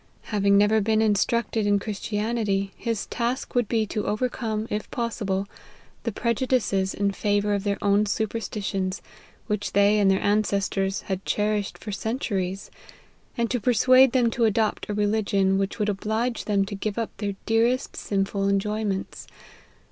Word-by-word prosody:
Having 200 -1 +4
never 210 +2 +4
been 220 +1 +2
instructed 220 +1 +1
in 205 0 +4
Chris 200 0 -4
tianity, 210 -2 -1
his 230 -4 -3
task 240 +3 -2
would 245 -3 +1
be 225 -1 +1
to 210 +1 -3
overcome, 220 -1 -1
if 210 +1 -3
possible, 205 -5 -2 0.6
the 230 - 0
prejudices 235 -4 0
in 200 0 +1
favour 205 +1 0
of 200 -1 -1
their 200 -1 0
own 205 +1 +3
superstitions, 205 -3 -2 0.4
which 210 -2 -2
they 200 +1 +4
and 200 -1 +4
their 190 0 +2
ancestors 200 -1 0
had 190 -1 -4
cherished 210 -1 -1
for 215 - -7
centuries; 200 -4 -3 0.7
and 235 -1 0
to 250 - +1
persuade 255 +2 +5
them 240 -3 +2
to 235 0 +1
adopt 220 -1 0
a - - -1
religion 205 -2 +1
which 195 0 -2
would 210 -2 0
oblige 220 +4 -1
them 200 -2 +2
to 205 - -7
give 200 +2 -3
up 230 -1 -3
their 200 -2 -3
dearest 230 +3 +1
sin 195 -1 -1
ful 195 0 -1
enjoyments. 200 0 -2
210 Hz, 155 wpm, -25 LUFS, 200-225 Hz, 0.7 s, persuade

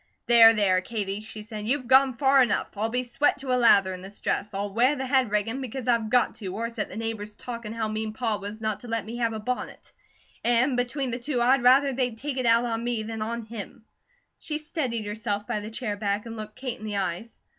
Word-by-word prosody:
"There, 230 -1 +8
there, 190 -3 +3
Katie!" 200 -1 -4
she 215 0 -9
said. 210 -1 -7
"You've 260 +1 0
gone 265 0 +5
far 270 0 +5
enough. 245 - +1
I'll 215 +2 -1
be 250 +2 -1
sweat 255 +4 +1
to 265 -2 -2
a - - +4
lather 200 -6 +5
in 180 - -8
this 195 +2 -10
dress; 210 - -1
I'll 200 0 -3
wear 250 +6 +3
the 265 -1 -3
head 260 -3 +2
riggin', 210 +5 -1
because 260 0 -5
I've 230 -3 +2
go 245 +1 +3
to, 190 -4 -7
or 230 +2 -3
set 225 -2 -4
the 195 - -8
neighbours 220 -2 -4
talkin' 235 -2 -7
how 225 -1 -2
mean 215 0 -3
Pa 220 -1 -1
was 205 +2 -7
not 215 -2 -1
to 245 - -11
let 230 -3 -2
me 230 +2 -6
have 230 -2 0
a 220 - -4
bonnet; 250 +4 -5 0.5
and 240 +3 +3
between 245 +2 -1
the 245 - -3
two 255 0 -2
I'd 255 +2 +4
rather 265 +3 +5
they'd 245 -3 -1
take 275 +2 -4
it 250 - 0
out 230 +1 +4
on 230 -1 -2
me 240 -2 -1
than 220 0 -5
on 230 +2 -3
him." 225 +1 -9 0.5
She 300 - -3
steadied 280 - -3
herself 205 -1 -3
by 210 - -2
the 210 +1 -7
chair 220 -2 -3
back 205 +1 -2
and 230 -1 -7
looked 215 -1 -7
Kate 255 -2 -5
in 215 - -8
the 205 -1 -2
eyes. 195 +4 -3
230 Hz, 240 wpm, -26 LUFS, 215-250 Hz, 0.5 s, There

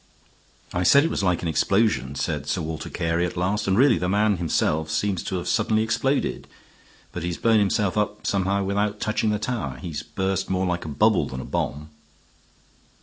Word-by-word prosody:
"I 90 - 0
said 140 +11 +6
it 165 - 0
was - - -1
like 90 -2 +1
an - - -1
explosion," 80 - +1
said 75 0 -3
Sir 75 +4 -1
Walter 80 0 -5
Carey 85 +1 -1
at 90 - -3
last. 100 +4 0
"And 95 0 +2
really 130 -5 +5
the 90 +1 -1
man 105 0 +2
himself 80 -2 0
seems 95 +3 0
to - - -3
have 85 - -5
suddenly 110 0 +2
exploded. 135 +5 -1 0.6
But 90 - -5
he 85 - -2
has 85 - -4
blown 115 -1 +3
himself 100 -1 +1
up 105 0 -1
somehow 100 0 +1
without 100 +2 -1
touching 110 0 0
the 105 - +1
tower. 120 +2 -3
He's 80 -5 -5
burst 95 0 -2
more 95 0 0
like 90 -2 -2
a - - -5
bubble 80 +2 +2
than 65 - -6
a - - -6
bomb." 75 +2 -3
95 Hz, 200 wpm, -24 LUFS, 85-105 Hz, 0.6 s, said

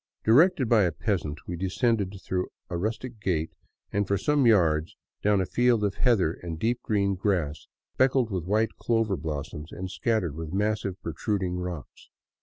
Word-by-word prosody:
Directed 140 +4 +5
by 110 -2 +5
a 85 - +1
peasant, 85 -9 -2
we 90 - -4
descended 100 +1 0
through 90 -1 -1 0.2
a - - -1
rustic 115 +4 -3
gate 80 -5 -1 0.4
and 100 -1 +1
for 100 - +1
some 145 +4 +2
yards 85 -7 +3 0.3
down 105 -1 +3
a 95 - +1
field 120 +1 +2
of 100 -2 +1
heather 100 -9 +2
and 85 -2 -5
deep 115 +7 0
green 100 -2 +1
grass 90 -6 -1 0.3
speckled 130 -3 +2
with 90 -4 -2
white 110 +4 +1
clover 115 -4 +1
blossoms 75 0 -5
and 95 0 -6
scattered 90 -2 0
with 80 +1 -6
massive 105 -2 -1
protruding 90 +3 -2
rocks. 90 -4 -7
100 Hz, 165 wpm, -27 LUFS, 85-110 Hz, 0.4 s, Directed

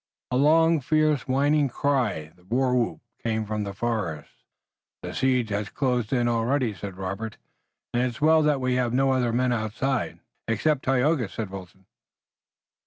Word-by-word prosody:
A - - 0
long 160 +4 +4
fierce 155 0 +1
whining 140 +2 +2
cry, 120 - -1
the 90 - -24
war 125 +5 +1
whoop, 120 -2 0 0.2
came 110 -1 -1
from 105 0 -2
the 100 - -4
forest. 100 -10 -3 0.7
"The - - -5
siege 125 -4 +1
has 105 0 -2
closed 125 -4 -1
in 120 -2 +2
already," 120 +1 +1
said 95 0 -8
Robert, 100 +3 -5 0.6
"and 120 - +2
it's 125 -2 -2
well 160 +1 +5
that 150 -2 +2
we 130 -1 0
have 125 -2 0
no 135 +1 +3
other 125 -3 +1
men 125 +1 +1
outside." 120 +4 -2 0.3
"Except 130 +6 +1
Tayoga," 130 -2 +2
said 105 -2 -5
Wilton. 95 0 -10
125 Hz, 160 wpm, -25 LUFS, 110-135 Hz, 0.7 s, well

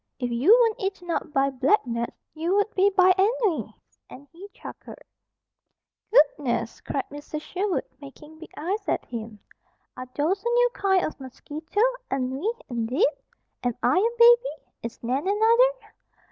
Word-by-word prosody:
If 245 -2 -3
you 240 +9 0
weren't 455 -3 +2
eaten 385 -3 -3
up 325 - -3
by 275 -1 +1
black 270 +8 +2
gnats, 235 -1 -4 0.2
you 330 +5 -1
would 410 +2 +1
be 390 +1 +4
by 370 -1 +5
ennui," 425 -4 +1 0.4
and 280 +2 -13
he 375 +4 -12
chuckled. - - -11 1.1
"Goodness!" 275 - +2
cried 275 - -3
Mrs. 290 +1 -7
Sherwood, 375 +3 -2 0.2
making 300 +2 -13
big 330 - -11
eyes 385 +6 -3
at - - -1
him. 225 -2 -7 0.6
"Are 255 - -7
those 355 +7 0
a 475 - 0
new 485 +1 +3
kind 385 -2 +2
of 310 - -6
mosquito? 300 - -5 0.3
Ennui, 270 - -1 0.2
indeed! 250 - +1 0.5
Am 245 -2 -1
I 370 - +4
a 465 +4 0
baby? 475 +1 +5 0.2
Is 230 0 -6
Nan 260 +8 -1
another?" 460 +3 +2
335 Hz, 150 wpm, -25 LUFS, 270-415 Hz, 1.1 s, by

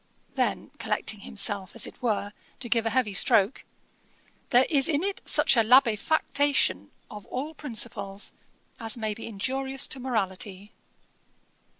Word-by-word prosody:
Then - - -1
collecting 215 - -2
himself 200 -1 +1
as 230 - +2
it - - -12
were, 210 -4 -1 0.3
to 245 - -5
give 230 -1 +1
a - - +2
heavy 230 -3 0
stroke: 195 +3 +3 0.9
'There 250 +1 +5
is 280 -3 +2
in 300 +1 +1
it 395 0 -2
such - - +3
a 230 - +5
labefactation 255 - +3 0.2
of 210 -2 -10
all 285 +5 -5
principles, 220 -8 -3 0.5
as 225 0 -1
may 220 -2 -2
be 220 - -9
injurious 265 +5 -2
to 265 - -6
morality.' 205 -4 -4
230 Hz, 135 wpm, -26 LUFS, 205-265 Hz, 0.9 s, There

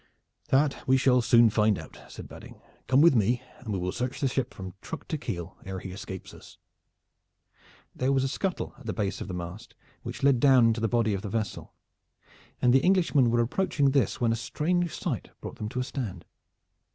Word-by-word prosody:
"That 140 +2 +2
we 130 0 +5
shall 125 -1 +4
soon 115 -1 +5
find 105 -1 +3
out," - - -10
said - - -9
Badding. - - -12 0.3
"Come 130 +2 +4
with 170 0 +7
me 120 +2 +2 0.2
and 110 - -7
we 100 - -1
will 90 0 -2
search 125 +5 -3
the 140 - +1
ship 130 0 -1
from 95 -1 -8
truck 165 - -7
to - - -1
keel 90 -7 -5
ere 95 0 -5
he 95 0 -7
escapes 95 0 -8
us." - - -14 1.4
There 130 +2 0
was 135 -1 +2
a - - +1
scuttle 185 +7 -3
at 130 - -12
the 110 - -1
base 100 -3 -2
of - - -5
the 95 - -5
mast 90 +6 -8 0.3
which - - -7
led 135 -3 +4
down 130 -2 +6
into 115 0 +2
the 115 - +2
body 115 -2 +1
of 95 - -2
the 105 - -5
vessel, 110 -1 -4 0.8
and 125 -1 +4
the 135 - +4
Englishmen 170 -9 +3
were 120 0 +3
approaching 140 +2 +1
this 135 -7 +1
when 115 -2 +2
a - - +1
strange 170 +9 -1
sight 130 - -4
brought - - -8
them 105 - -4
to 125 - -4
a - - 0
stand. 110 - -5
120 Hz, 210 wpm, -27 LUFS, 105-135 Hz, 1.4 s, with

